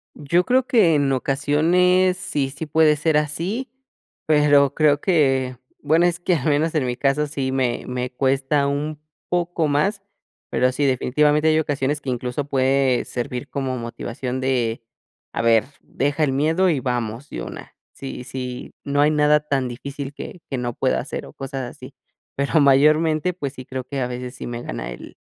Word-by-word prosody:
Yo 170 +5 +1
creo 255 +3 +2
que 220 - +4
en 140 -1 +2
ocasiones 170 +8 +2
sí, 145 -6 -2
sí 145 +4 -6
puede 155 0 +4
ser 155 +1 +1
así, 175 - -2 0.6
pero 145 -2 +4
creo 145 -2 +3
que, 135 -8 +2 0.3
bueno, 160 +4 +3
es 175 0 +1
que 175 0 +1
al 155 0 -1
menos 155 +3 +1
en 150 -4 +1
mi 120 0 -2
caso 140 +3 +1
sí 135 -2 -2
me 125 -3 0
me 125 0 -3
cuesta 135 +2 +1
un 145 +2 -2 0.3
poco 175 -3 0
más, 195 +8 +1 0.5
pero 125 0 +2
sí, 145 +3 -1
definitivamente 150 +4 +2
hay 155 0 +4
ocasiones 145 -1 -1
que 135 - -4
incluso 125 +3 -3
puede 135 -1 +2
servir 125 +3 -5
como 135 -2 -2
motivación 120 +2 -5
de: 120 -3 0 0.5
"A - - -2
ver, 115 -1 +4 0.2
deja 145 +3 -1
el 135 - 0
miedo 160 +7 +2
y 145 -5 0
vamos 120 +1 -3
de - - -5
una". - - -9 0.2
Si 135 -2 -7
si 125 -1 -6
no 140 0 0
hay 150 +1 +4
nada 150 0 +4
tan 135 -3 0
difícil 140 +3 -6
que 170 - -9
que 135 - -2
no 120 -1 -3
pueda 130 - +1
hacer 135 - -6
o - - -13
cosas 135 -2 -5
así. 130 +2 -12 0.4
Pero 140 +3 +2
mayormente, 155 +5 +4
pues 145 -6 -5
sí 130 -2 -10
creo 130 -1 -5
que 140 0 -4
a 125 - 0
veces 125 +1 -6
sí - - -7
me 120 0 -5
gana - - -5
el - - -10
140 Hz, 180 wpm, -22 LUFS, 130-155 Hz, 0.6 s, que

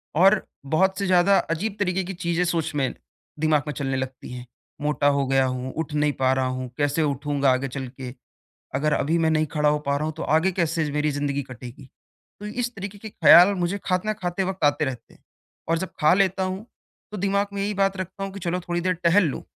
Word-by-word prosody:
और 190 +5 +5 0.2
बहुत 190 +7 +2
से 200 - -1
ज़्यादा 185 +2 +5
अजीब 195 +6 -2
तरीके 190 -1 0
की 190 +2 -5
चीज़ें 175 -1 -1
सोच 165 -3 -1
में 135 -3 0 0.5
दिमाग 155 -2 +2
में 150 - -2
चलने 135 -2 -2
लगती 130 -1 -6
हैं। 125 -1 -7 0.4
मोटा 150 -1 +1
हो 140 -1 +2
गया 135 0 +3
हूँ, 130 0 -3
उठ 160 -1 -3
नहीं 150 0 +1
पा 130 0 +3
रहा 130 0 0
हूँ, 130 0 -4
कैसे 145 +2 +1
उठूँगा 140 -1 +1
आगे 130 +1 0
चल 130 0 -5
के? 125 -1 -8 0.6
अगर 150 +3 +1
अभी 160 +4 +1
मैं 160 -1 +2
नहीं 155 0 +2
खड़ा 150 -2 +2
हो 150 - +2
पा 140 - +1
रहा 150 - -2
हूँ 155 - -2
तो 165 - -5
आगे 160 +5 +2
कैसे 165 -3 0
मेरी 150 0 +1
ज़िंदगी 140 0 -1
कटेगी? 125 +1 -11 0.5
तो 210 - -6
इस 240 +3 -3
तरीके 200 0 -7
के 220 - -8
ख़्याल 200 -1 +7
मुझे 180 +1 -1
खाना 185 +4 0
खाते 185 -2 -2
वक़्त 190 -2 -3
आते 145 +1 +3
रहते 130 -4 -6
हैं। - - -26 0.5
और 165 - +2
जब 190 +2 -4
खा 150 +1 +5
लेता 190 0 +2
हूँ 190 +4 -4 0.5
तो - - -4
दिमाग 200 +1 +1
में 200 - -4
यही 205 +1 -1
बात 195 0 +1
रखता 190 +1 -5
हूँ 195 - -6
कि 200 - -7
चलो 180 0 -2
थोड़ी 175 0 -2
देर 185 +1 +1
टहल 180 +3 +5
लूँ। - - -6
160 Hz, 225 wpm, -24 LUFS, 140-190 Hz, 0.6 s, ख़्याल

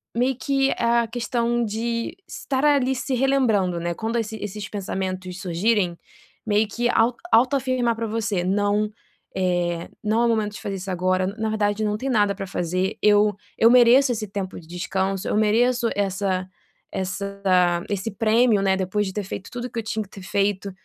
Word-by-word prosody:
meio 250 +2 +1
que 275 0 +1
a 235 0 +2
questão 235 0 -1
de 230 +6 -3
estar 265 -1 -3
ali 265 -3 +3
se 265 - -3
relembrando, 240 -9 +2
né, 170 0 -2
quando 225 +6 -2
esse 220 -1 -3
esses 205 0 -6
pensamentos 185 -2 -4
surgirem, 180 0 +1 0.5
meio 210 0 +2
que 240 +3 -1
au 230 +2 +3 0.2
autoafirmar 255 -1 +2
pra 230 0 -3
você: 210 -4 -1
"Não, 205 +3 +1 0.5
eh, 175 -2 -1
não 220 +2 +1
é - - +4
o - - +2
momento 215 -2 0
de - - -9
fazer 200 - -4
isso 190 +1 -5
agora. 185 +1 +1
Na 220 +2 -3
verdade, 210 0 0
não 210 0 0
tem 270 - -4
nada 205 -4 +2
para 195 -1 -6
fazer, 185 +2 -2
eu 210 -1 +4 0.2
eu 230 - +6
mereço 250 +2 +6
esse 215 -2 -3
tempo 195 -1 -5
de 160 - -16
descanso, 190 +2 -2
eu - - 0
mereço 235 +3 +2
essa 190 -2 -1 0.4
essa 200 +1 -4 0.5
esse 200 +1 -2
prêmio, 220 +1 +3
né, 195 -1 +2
depois 195 +2 -1
de 190 - -6
ter 210 0 -3
feito 190 0 -7
tudo 245 0 -5
que 235 - -4
eu 225 - -4
tinha 220 0 -2
que 195 - -18
ter 195 - -11
feito, 200 0 -1
210 Hz, 180 wpm, -23 LUFS, 190-235 Hz, 0.5 s, eu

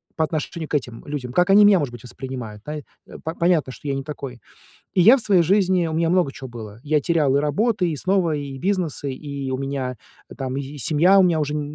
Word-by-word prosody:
по 160 - +1
отношению 155 +1 -4
к - - -11
этим 125 -5 -3
людям, 140 -4 -5
как 180 +6 +3
они 205 +2 +8
меня, 205 -1 +6
может 145 -7 -2
быть, 120 -1 -10
воспринимают. 120 -4 -8
Наи 150 0 -5 0.6
понятно, 170 -6 +2
что 125 +4 -10
я 140 - 0
не 135 0 -3
такой. 135 -4 -7 0.5
И 185 - +3
я 225 +9 +8
в - - -3
своей 195 -6 +3
жизни, 185 -1 +2
у - - -4
меня 165 +1 +1
много 175 -6 +2
чего 135 - -8
было. 110 -3 -9
Я 150 0 +2
терял 150 -3 +2
и - - +3
работы, 180 - +1
и 155 - -3
снова, 180 -1 +1
и 140 -2 -6
бизнесы, 165 -4 -2
и 140 0 -6
у 130 - -2
меня 135 -2 -3 0.4
там 130 -1 -3
и - - -1
и 140 +2 -9
семья 165 +8 +4
у 190 - +6
меня 170 -3 +2
уже 150 0 -2
н 150 - -1
150 Hz, 235 wpm, -22 LUFS, 135-175 Hz, 0.6 s, они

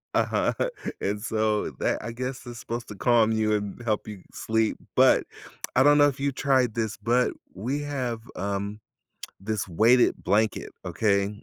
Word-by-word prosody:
Uh-huh, - - +1 0.5
and 105 +1 -1
so 110 -5 0
that, - - 0
I 115 - -4
guess, 130 +2 -5
is 120 -1 -8
supposed 120 +1 -5
to 105 - -7
calm 110 +3 +3
you 110 -1 +1
and 105 +2 -4
help 110 -3 -1
you 105 -3 -8
sleep, 110 0 0 0.2
but, - - +5 0.5
I 130 - +5
don't 145 +2 +6
know 145 - +6
if 140 -2 -3
you 140 0 0
tried 130 -4 +1
this, 110 -2 -2
but 120 +4 +2 0.2
we 125 +10 -2
have, 130 -5 -3 0.2
um, 100 +2 -3 0.6
this 110 +1 -3
weighted 115 +8 +4
blanket, 105 +3 +1 0.2
okay? 100 -1 0
110 Hz, 165 wpm, -26 LUFS, 105-125 Hz, 0.6 s, don't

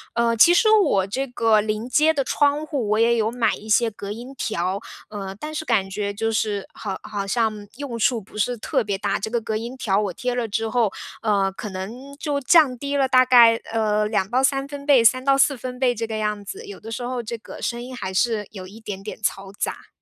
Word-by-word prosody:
呃， 235 0 +2
其 340 +10 +7
实 435 +4 +4
我 310 - +4
这 260 +7 -2
个 225 -4 +3
临 215 +2 -3
街 310 +4 +3
的 275 -3 -1
窗 290 +1 +1
户， 275 -9 -2
我 215 +1 +2
也 235 +1 +4
有 225 -1 0
买 235 -3 +1
一 215 - -12
些 230 +1 +4
隔 205 -1 -8
音 245 +5 -8
条， 195 -3 -2 0.3
呃， 200 -3 -6
但 310 0 -6
是 315 - -2
感 220 -9 +1
觉 200 +1 -3
就 225 +2 -1
是 210 -2 -1
好 195 -3 -5
好 200 -2 -4
像 215 -1 -1
用 265 -5 -5
处 230 +1 +2
不 205 +2 -14
是 245 +3 0
特 215 - -1
别 200 -2 -2
大。 200 0 -1
这 220 - -5
个 235 - +1
隔 220 -1 -4
音 235 +4 -5
条 200 -6 0
我 200 -3 -2
贴 250 +6 -3
了 245 - -1
之 225 +1 -2
后， 225 -4 +1 0.3
呃， 200 -3 +2
可 210 - -6
能 225 +9 -7
就 290 -2 -2
降 280 -3 +5
低 280 +3 -2
了 270 - +3
大 255 0 +5
概， 235 -2 +7 0.2
呃， 215 -1 +1
2 195 -3 0
到 255 +2 +1
3 275 0 +1
分 280 0 -8
贝， 280 -4 +6
3 255 +3 +4
到 275 0 +3
4 275 0 +4
分 250 0 -7
贝 250 -2 +2
这 225 0 -2
个 220 -1 -4
样 210 -1 -2
子， 200 - -8
有 200 - -10
的 225 - -8
时 230 - -4
候 245 -1 -3
这 235 +1 -5
个 - - -11
声 240 0 -2
音 255 +1 -8
还 190 -5 -5
是 215 +1 +1
有 185 -3 -8
一 220 +4 -13
点 200 -3 -6
点 205 - -7
嘈 195 -2 -2
杂。 - - -4
225 Hz, 250 characters per minute, -23 LUFS, 210-255 Hz, 0.3 s, 其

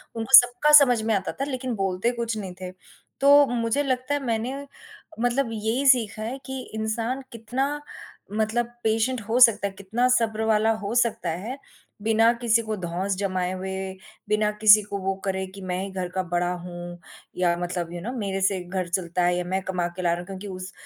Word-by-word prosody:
उनको 225 +4 +7
सबका 245 +5 +4
समझ 245 -4 +1
में 225 - +1
आता 190 - -2
था 275 - +1
लेकिन 255 -2 -3
बोलते 195 +3 0
कुछ 235 -2 -3
नहीं 190 -3 -6
थे। 180 0 -5 0.5
तो 285 +1 +7
मुझे 235 +3 0
लगता 255 +1 -1
है 290 -1 -1
मैंने 235 +3 -2 0.6
मतलब 245 +1 +1
यही 225 +5 -1
सीखा 225 -5 +3
है 240 +5 -4
कि 265 -1 -5 0.2
इंसान 225 +4 -2
कितना 265 +6 -3 0.5
मतलब 220 +2 0 0.2
पेशेंट 225 +3 0
हो 240 +3 +2
सकता 220 -4 +6
है, 195 - -8
कितना 210 +6 -1
सब्र 220 -3 +1
वाला 220 0 +3
हो 205 - -3
सकता 230 -6 +1
है, 200 +11 -5 0.4
बिना 225 +2 +4
किसी 230 -1 +3
को 215 - -1
धौंस 185 +2 -2
जमाए 185 -2 -1
हुए, 190 0 -5 0.4
बिना 210 0 +2
किसी 215 0 +8
को 200 0 -5
वो 190 0 -1
करे 190 -1 -1
कि 195 - -9
मैं 180 -1 -3
ही 195 - -5
घर 185 -1 -3
का 185 +1 -2
बड़ा 175 0 +1
हूँ 175 0 -8 0.4
या 175 -1 +2
मतलब 175 -1 -4
यू 175 - -5
नो 230 +7 -4
मेरे 195 -3 -2
से 190 -1 +1
घर 180 0 -3
चलता 175 0 -1
है 175 0 +2
या 180 - -1
मैं 190 +1 -1
कमा 180 -2 -2
के 185 - -5
ला 175 -1 +1
रहा 170 - -3
हूँ - - -10
क्योंकि 195 +1 -7
उस 185 0 -8
215 Hz, 200 wpm, -24 LUFS, 185-240 Hz, 0.6 s, किसी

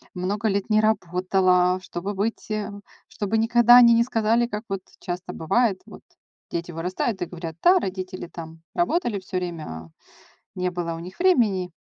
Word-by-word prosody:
много 200 +4 -1
лет 200 0 -1
не 215 - +5
работала, 185 -2 +2
чтобы 190 +4 -5
быть 215 +4 -3
э, 215 -1 -3 0.4
чтобы 210 +2 -2
никогда 240 +2 +6
они 235 -1 +8
не 230 - +4
сказали, 235 0 +1
как 210 -1 -5
вот 195 -1 -3 0.2
часто 180 0 -5
бывает. 195 +4 +1
Вот - - -13 0.5
дети 170 +1 -4
вырастают 180 +5 -3
и 175 - 0
говорят: 165 -2 -7
"Да, 365 +2 +6
родители 185 - -5
там 165 -1 -10
работали 335 - 0
всё 185 0 -5
время, 175 -3 -4
а 80 0 -8 0.7
не 180 0 -1
было 175 -2 -3
у - - -6
них 180 +2 -10
времени". 220 - +2
190 Hz, 165 wpm, -24 LUFS, 180-225 Hz, 0.7 s, они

